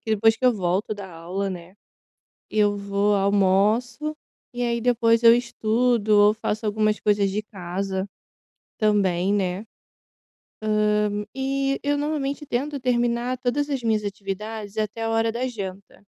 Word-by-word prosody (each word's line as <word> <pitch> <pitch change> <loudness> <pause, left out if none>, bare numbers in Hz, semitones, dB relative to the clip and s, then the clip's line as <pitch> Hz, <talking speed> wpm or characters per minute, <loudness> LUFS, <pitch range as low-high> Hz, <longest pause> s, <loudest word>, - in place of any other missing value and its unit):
que 220 - -6
depois 225 +2 +4
que 255 - -6
eu 250 - +6
volto 190 +1 -1
da 200 -2 -7
aula, 180 +4 -4
né, 180 +1 -8 0.7
eu 205 -1 +2
vou, 200 +1 +1
almoço, 205 +9 +1 0.4
e 245 - -3
aí 235 -1 0
depois, 230 -1 +2
eu 230 0 +9
estudo 235 -1 0
ou 205 +1 +6
faço 215 0 -3
algumas 215 0 +1
coisas 205 -1 +2
de 205 +2 -2
casa, 190 0 -4 0.7
também, 200 -3 +2
né, 190 +1 -1 1.5
hã, 205 0 -3
e 275 +1 -1
eu 290 0 0
normalmente, 295 -1 -2
tento 280 +3 -2
terminar 240 0 0
todas 260 +4 -1
as 275 -4 -2
minhas 220 -2 +1
atividades, 205 +1 -5
até 215 +1 -2
a 225 - -1
hora 225 0 +2
da 240 +3 -2
janta. 200 -5 -7
215 Hz, 145 wpm, -24 LUFS, 200-245 Hz, 1.5 s, eu